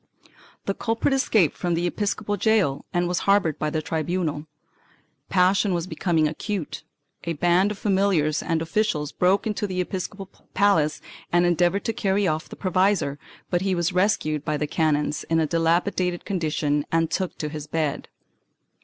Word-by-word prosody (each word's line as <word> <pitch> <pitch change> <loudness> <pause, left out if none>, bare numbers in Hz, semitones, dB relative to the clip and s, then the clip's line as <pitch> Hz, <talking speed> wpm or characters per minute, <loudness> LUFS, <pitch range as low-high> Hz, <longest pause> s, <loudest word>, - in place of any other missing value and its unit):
The 195 - 0
culprit 230 +6 0
escaped 220 - +2
from 175 -1 -1
the 170 +1 0
episcopal 205 +3 -1
gaol 200 -9 +1
and 175 0 +1
was 175 0 0
harbored 195 -7 +3
by 155 - 0
the 155 0 -2
tribunal. 160 -2 -2 0.8
Passion 190 +1 +3
was 170 -1 -2
becoming 170 -4 +1
acute; 175 +2 -4 0.4
a 170 - -1
band 175 +5 +3
of 210 - -5
familiars 190 -7 +1
and 165 -1 -1
officials 160 -4 0
broke 185 +3 +2
into 210 -1 -1
the 185 -1 -3
episcopal 190 +2 -4 0.3
palace 165 -7 +3 0.3
and 175 0 +4
endeavored 175 +3 +2
to 225 - 0
carry 195 -1 +1
off 155 -1 -2
the - - -8
provisor, 185 -6 +1 0.3
but 175 -1 +1
he 190 -1 0
was 175 +1 0
rescued 180 -6 +1
by 150 -1 -1
the 150 - -1
canons 150 -1 0
in 165 0 +1
a 160 - +2
dilapidated 170 +2 0
condition 155 -5 0
and 165 -1 +1
took 185 -2 -2
to 150 - -3
his 150 -1 -7
bed. 155 -2 -2
175 Hz, 160 wpm, -24 LUFS, 155-195 Hz, 0.8 s, and